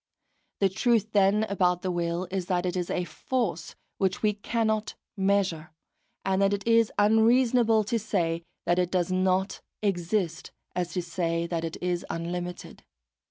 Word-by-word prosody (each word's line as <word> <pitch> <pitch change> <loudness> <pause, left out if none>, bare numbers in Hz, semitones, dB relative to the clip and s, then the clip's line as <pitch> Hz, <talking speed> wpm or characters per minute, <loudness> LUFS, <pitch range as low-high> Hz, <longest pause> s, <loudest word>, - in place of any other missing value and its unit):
The 195 - +4
truth 220 +2 +1
then 205 +1 +4
about 180 -4 +1
the 185 - 0
will 175 +1 -2
is 185 -2 -2
that 180 -1 0
it 180 0 -1
is 180 -1 -2
a 180 - 0
force 175 -1 -3 0.2
which 190 +1 0
we 210 -1 +3
cannot 220 +1 -1 0.2
measure, 190 -5 0 0.6
and 190 0 +1
that 195 0 +3
it 200 +1 -3
is 230 -1 +4
as 205 +1 +4
unreasonable 230 0 +4
to 230 +3 -1
say 170 -6 -1 0.2
that 175 +1 +2
it 180 -1 +1
does 180 -1 0
not 185 +1 +1 0.2
exist 175 -3 -1 0.3
as 175 -1 -2
to 180 - -1
say 170 -1 -1
that 170 -1 -3
it 165 -1 -4
is 180 -1 -1
unlimited. 175 +1 -5
185 Hz, 160 wpm, -27 LUFS, 175-210 Hz, 0.6 s, The